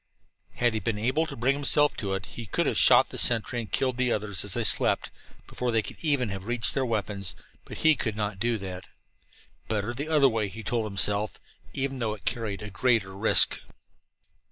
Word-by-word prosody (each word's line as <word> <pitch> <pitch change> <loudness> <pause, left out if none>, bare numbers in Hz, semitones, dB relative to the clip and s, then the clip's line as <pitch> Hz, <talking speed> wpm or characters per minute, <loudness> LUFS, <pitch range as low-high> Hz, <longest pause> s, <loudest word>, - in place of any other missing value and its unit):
Had 120 -1 +1
he 110 - -1
been 105 +2 -2
able 130 +9 0
to - - -7
bring 125 +4 +1
himself 145 +1 +2
to 100 -2 -2
it, 95 - -5
he 115 -2 -9
could - - 0
have - - +1
shot - - +6
the - - -4
sentry 120 +1 +3
and 110 -3 -7
killed 130 -2 0
the 125 -1 +1
others 105 -5 -2
as 105 -1 -3
they 120 - -1
slept, 105 - +2 0.3
before 125 - -4
they 115 -1 +1
could - - -8
even 140 -7 +1
have 100 0 -6
reached 120 -1 0
for - - -8
their 135 -1 0
weapons. 100 -6 -2 0.3
But - - -9
he 160 -1 +7
could 110 -5 -3
not 105 -2 -3
do 120 +1 +1
that. 95 -2 -8 0.8
Better 110 +2 -2
the 140 +5 -5
other 150 -3 +5
way, 110 -4 0
he 110 +3 -9
told 115 +1 -1
himself, 105 +1 0 0.3
even 135 -1 -3
though 110 -3 -1
it 105 - -18
carried 110 -3 -3
a 105 - -8
greater 100 -2 +1
risk. 105 +3 +4
115 Hz, 210 wpm, -27 LUFS, 100-125 Hz, 0.8 s, he